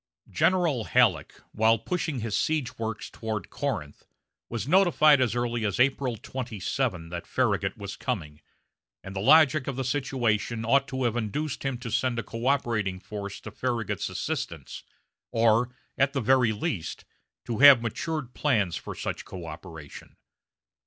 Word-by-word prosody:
General 165 Hz, -, +2 dB
Halleck, 105 Hz, -, +3 dB, 0.2 s
while 110 Hz, +1 st, +3 dB
pushing 160 Hz, -1 st, -3 dB
his 110 Hz, -2 st, -2 dB
siege 130 Hz, +3 st, -1 dB
works 110 Hz, -1 st, -4 dB
toward 110 Hz, -1 st, -5 dB
Corinth, 95 Hz, -, -4 dB, 0.4 s
was 115 Hz, +1 st, -4 dB
notified 155 Hz, -5 st, +5 dB
as 120 Hz, -2 st, +1 dB
early 120 Hz, -1 st, -1 dB
as 100 Hz, 0 st, -1 dB
April 130 Hz, -2 st, +2 dB
27 110 Hz, -5 st, -3 dB
that 85 Hz, 0 st, -6 dB
Farragut 105 Hz, -4 st, 0 dB
was 100 Hz, -1 st, -7 dB
coming, 75 Hz, -, -4 dB, 0.6 s
and 95 Hz, +1 st, -8 dB
the -, -, -2 dB
logic 150 Hz, +4 st, +5 dB
of 140 Hz, -, -2 dB
the 130 Hz, -, -2 dB
situation 120 Hz, -4 st, -1 dB
ought 140 Hz, +4 st, +3 dB
to 130 Hz, 0 st, -3 dB
have 120 Hz, -2 st, +1 dB
induced 130 Hz, +6 st, -2 dB
him 135 Hz, -2 st, -1 dB
to 120 Hz, -1 st, -7 dB
send 125 Hz, 0 st, 0 dB
a 115 Hz, -, -1 dB
coöperating 115 Hz, -5 st, -1 dB
force 100 Hz, 0 st, -7 dB
to 110 Hz, -, -8 dB
Farragut's 115 Hz, -2 st, -2 dB
assistance, -, -, -4 dB, 0.5 s
or, 115 Hz, +1 st, +3 dB, 0.3 s
at 140 Hz, +1 st, +3 dB
the 140 Hz, -, 0 dB
very 125 Hz, -1 st, +4 dB
least, 110 Hz, -, -4 dB, 0.4 s
to 115 Hz, -2 st, -3 dB
have 135 Hz, -4 st, +9 dB
matured 130 Hz, +2 st, -3 dB
plans 105 Hz, -, +1 dB
for -, -, -6 dB
such -, -, -4 dB
coöperation. 80 Hz, -3 st, -10 dB
120 Hz, 145 wpm, -27 LUFS, 105-135 Hz, 0.6 s, have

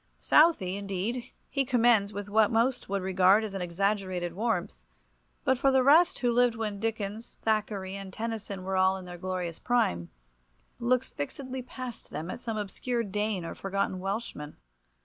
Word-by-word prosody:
Southey, 250 Hz, -, +4 dB
indeed, 200 Hz, +5 st, -3 dB, 0.2 s
he 275 Hz, -, 0 dB
commends 235 Hz, -5 st, +3 dB
with 205 Hz, 0 st, -5 dB
what 215 Hz, +1 st, +4 dB
most 235 Hz, +1 st, +1 dB
would 195 Hz, -1 st, -1 dB
regard 190 Hz, +3 st, +4 dB
as 215 Hz, -2 st, -4 dB
exaggerated 185 Hz, -1 st, -1 dB
warmth, 200 Hz, -, -2 dB, 0.6 s
but 260 Hz, -, +2 dB
for 275 Hz, -, +4 dB
the 265 Hz, -1 st, +4 dB
rest 315 Hz, +6 st, +6 dB
he -, -, -4 dB
who 240 Hz, -, +3 dB
lived 245 Hz, -1 st, +3 dB
when 215 Hz, -3 st, -3 dB
Dickens, 220 Hz, 0 st, -4 dB
Thackeray, 205 Hz, -3 st, -1 dB
and 195 Hz, -1 st, -7 dB
Tennyson 215 Hz, -3 st, -4 dB
were 190 Hz, +1 st, -2 dB
all 190 Hz, 0 st, +4 dB
in 185 Hz, -, -9 dB
their 175 Hz, -1 st, -9 dB
glorious 180 Hz, -2 st, -3 dB
prime, 90 Hz, -, +1 dB, 0.7 s
looks 250 Hz, +2 st, +1 dB
fixedly 260 Hz, -, -5 dB
past 255 Hz, -1 st, -8 dB
them 165 Hz, +4 st, -5 dB
at -, -, -6 dB
some 225 Hz, -2 st, -4 dB
obscure 230 Hz, +4 st, -2 dB
Dane 205 Hz, -3 st, -2 dB
or -, -, -5 dB
forgotten 195 Hz, -1 st, -2 dB
Welshman. 195 Hz, -6 st, -4 dB
205 Hz, 165 wpm, -29 LUFS, 190-235 Hz, 0.7 s, rest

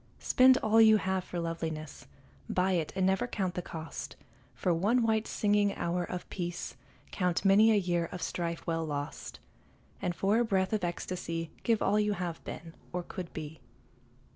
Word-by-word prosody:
Spend 255 Hz, 0 st, +5 dB
all 220 Hz, +1 st, +5 dB
you 220 Hz, -1 st, +7 dB
have 190 Hz, -2 st, -1 dB
for 175 Hz, -, -5 dB
loveliness, 160 Hz, -2 st, -4 dB, 0.4 s
Buy 185 Hz, +1 st, +2 dB
it 170 Hz, -4 st, 0 dB
and 190 Hz, -1 st, +2 dB
never 190 Hz, +5 st, +2 dB
count 190 Hz, -6 st, -2 dB
the 180 Hz, -, -3 dB
cost; 160 Hz, -2 st, -7 dB, 0.4 s
For 180 Hz, -, +1 dB
one 215 Hz, +9 st, +2 dB
white 220 Hz, -1 st, +1 dB
singing 205 Hz, -1 st, +2 dB
hour 175 Hz, +1 st, -1 dB
of 180 Hz, +1 st, -5 dB
peace 175 Hz, -1 st, -4 dB, 0.4 s
Count 180 Hz, 0 st, 0 dB
many 210 Hz, +3 st, +6 dB
a -, -, +4 dB
year 175 Hz, -4 st, +1 dB
of 180 Hz, -3 st, -5 dB
strife 170 Hz, -1 st, -3 dB
well 165 Hz, -1 st, -1 dB
lost, 145 Hz, -, -5 dB, 0.6 s
And 175 Hz, -, -1 dB
for 200 Hz, +5 st, +2 dB
a -, -, +4 dB
breath 190 Hz, -3 st, 0 dB
of 215 Hz, -, 0 dB
ecstasy 170 Hz, -2 st, -3 dB
Give 225 Hz, -2 st, +1 dB
all 210 Hz, -, +3 dB
you 210 Hz, 0 st, +2 dB
have 175 Hz, -4 st, -4 dB
been, 165 Hz, 0 st, -8 dB, 0.2 s
or 180 Hz, 0 st, -3 dB
could 175 Hz, 0 st, -7 dB
be. 155 Hz, 0 st, -7 dB
180 Hz, 175 wpm, -30 LUFS, 170-205 Hz, 0.6 s, you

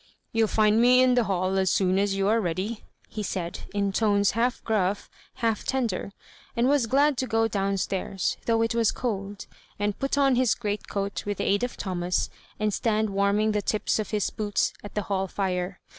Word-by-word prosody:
" -, -, -48 dB
You'll 225 Hz, -1 st, +3 dB
find 215 Hz, +1 st, +3 dB
me 250 Hz, +1 st, +6 dB
in 255 Hz, -1 st, +4 dB
the 245 Hz, -2 st, +3 dB
hall 190 Hz, 0 st, 0 dB
as 190 Hz, -1 st, +2 dB
soon 185 Hz, +1 st, +2 dB
as 200 Hz, -1 st, +1 dB
you 195 Hz, 0 st, +1 dB
are 225 Hz, +2 st, +3 dB
ready," 190 Hz, +5 st, -3 dB, 0.3 s
be 215 Hz, -, -2 dB
said, 180 Hz, -4 st, -4 dB
in 200 Hz, -1 st, 0 dB
tones 205 Hz, -1 st, +2 dB
half 240 Hz, +3 st, 0 dB
gruff, 200 Hz, -3 st, -1 dB, 0.2 s
half 225 Hz, -2 st, -1 dB
tender, 235 Hz, -7 st, -1 dB, 0.5 s
and 235 Hz, +2 st, +3 dB
was 275 Hz, -4 st, +3 dB
glad 280 Hz, +2 st, +3 dB
to 260 Hz, -, -1 dB
go 225 Hz, -1 st, +2 dB
down 195 Hz, -2 st, -1 dB
stairs, 190 Hz, 0 st, -2 dB
though 225 Hz, -1 st, +3 dB
it 225 Hz, -, 0 dB
was 230 Hz, -2 st, +2 dB
cold, 205 Hz, -4 st, -4 dB, 0.3 s
and 205 Hz, 0 st, -2 dB
put 275 Hz, +1 st, -1 dB
on 275 Hz, -3 st, +4 dB
his 250 Hz, -2 st, +3 dB
greatcoat 205 Hz, -2 st, -3 dB
with 205 Hz, -, -2 dB
the -, -, -2 dB
aid 200 Hz, +3 st, +2 dB
of 245 Hz, -, -3 dB
Thomas, 180 Hz, -2 st, -1 dB, 0.3 s
and 210 Hz, -1 st, 0 dB
stand 215 Hz, -1 st, 0 dB
warm 200 Hz, +1 st, +2 dB
ing 215 Hz, 0 st, +2 dB
the 210 Hz, -1 st, 0 dB
tips 215 Hz, +2 st, 0 dB
of 215 Hz, -, -3 dB
his 210 Hz, -2 st, -1 dB
boots 205 Hz, -1 st, -1 dB
at 205 Hz, -, -9 dB
the 210 Hz, -, 0 dB
hall 195 Hz, 0 st, -1 dB
fire. 180 Hz, -1 st, -2 dB
210 Hz, 205 wpm, -26 LUFS, 195-230 Hz, 0.5 s, me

